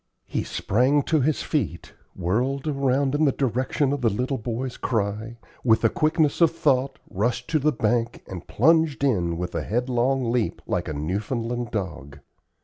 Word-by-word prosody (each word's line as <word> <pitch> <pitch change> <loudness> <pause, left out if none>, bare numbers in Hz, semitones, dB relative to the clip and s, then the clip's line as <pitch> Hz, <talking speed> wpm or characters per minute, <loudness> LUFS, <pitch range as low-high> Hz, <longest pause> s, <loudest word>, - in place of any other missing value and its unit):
He - - -2
sprang 130 +8 +1
to 155 0 +2
his 150 +3 +1
feet, 90 - -2 0.2
whirled 125 - -1
around 140 -2 +1
in 150 +2 +3
the 140 - +4
direction 130 +3 0
of 145 - -3
the 115 - +3
little 125 +6 -2
boy's 120 +3 -4
cry, 110 0 -2 0.3
with 110 -3 +4
the 115 - +3
quickness 155 0 +1
of 165 - +7
thought 135 -4 +1
rushed 120 +5 -1
to 155 - +3
the 150 +2 +2
bank 115 -1 -1
and 90 -2 -8
plunged 160 +2 +3
in 90 -11 +1
with 90 +1 -4
a 85 - -1
headlong 125 - 0
leap 120 -2 0
like 90 -1 -2
a 75 - -3
Newfoundland 115 - -2
dog. 80 -10 -5
125 Hz, 165 wpm, -24 LUFS, 105-140 Hz, 0.3 s, of